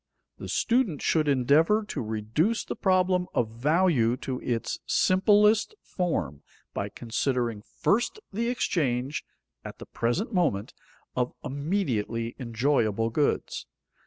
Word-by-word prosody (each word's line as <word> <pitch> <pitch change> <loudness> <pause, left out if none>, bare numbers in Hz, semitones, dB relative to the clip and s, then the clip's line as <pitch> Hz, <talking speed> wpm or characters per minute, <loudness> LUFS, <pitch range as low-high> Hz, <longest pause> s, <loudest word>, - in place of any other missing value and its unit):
The - - -7
student 235 - +1
should 155 -2 +2
endeavor 150 - +3
to - - -3
reduce 110 - -1
the - - -4
problem 185 -1 +2
of 115 -3 +1
value 135 -1 +2
to 130 -2 -3
its 115 -2 -2
simplest 210 - +4
form 85 - -2 0.3
by 100 - -3
considering 120 -1 -2
first 240 - 0
the 230 +4 0
exchange, 140 - -1 0.4
at - - -8
the - - -10
present 165 - -2
moment, 155 - 0 0.4
of 125 -1 0
immediately 130 - -2
enjoyable 115 -3 +1
goods. 145 +5 -1
140 Hz, 115 wpm, -27 LUFS, 115-185 Hz, 0.4 s, simplest